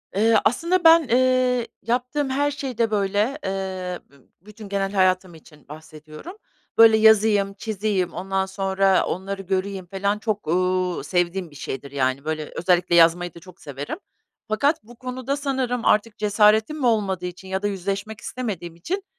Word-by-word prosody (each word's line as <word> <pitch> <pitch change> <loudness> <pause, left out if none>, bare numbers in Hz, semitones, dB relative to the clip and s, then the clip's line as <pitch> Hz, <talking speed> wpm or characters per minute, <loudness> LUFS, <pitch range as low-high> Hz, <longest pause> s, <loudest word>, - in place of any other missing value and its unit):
Eee, 225 +3 +3
aslında 345 +8 +1
ben, 325 -2 +7
eee, 250 -1 +2 0.2
yaptığım 255 +4 -1
her 285 +2 0
şeyde, 250 -6 -2
böyle, 205 +5 0
eee, 190 -2 -4
bü 140 -2 -24
bütün 210 +1 -12
genel 195 -1 -1
hayatım 185 -2 +1
için 150 -2 -18
bahsediyorum. 155 - -11 0.4
Böyle, 225 -1 +8
yazayım, 215 -2 +4
çizeyim, 195 -3 -2
ondan 190 +1 -2
sonra 195 0 +1
onları 195 +2 -4
göreyim 190 0 -3
falan 200 +3 -2
çok, 210 -6 -3
uuu, 180 0 0
sevdiğim 175 +3 -1
bir - - -16
şeydir, 140 0 -6
yani, 135 0 -1
böyle, 155 -1 -4
özellikle 175 -1 +2
yazmayı 170 +1 +4
da - - -12
çok 185 +1 -16
severim 145 0 -6 0.5
fakat 280 +6 +1
bu 240 +3 -15
konuda 255 +2 -4
sanırım 260 -4 -2
artık 215 +1 +2
cesaretim 215 +5 +3
mi 280 - -2
olmadığı 195 -6 0
için 180 +1 -8
ya 190 0 -2
da 205 - 0
yüzleşmek 200 +2 -4
istemediğim 185 -9 -5
için, 370 - -4
195 Hz, 155 wpm, -23 LUFS, 180-230 Hz, 0.5 s, Böyle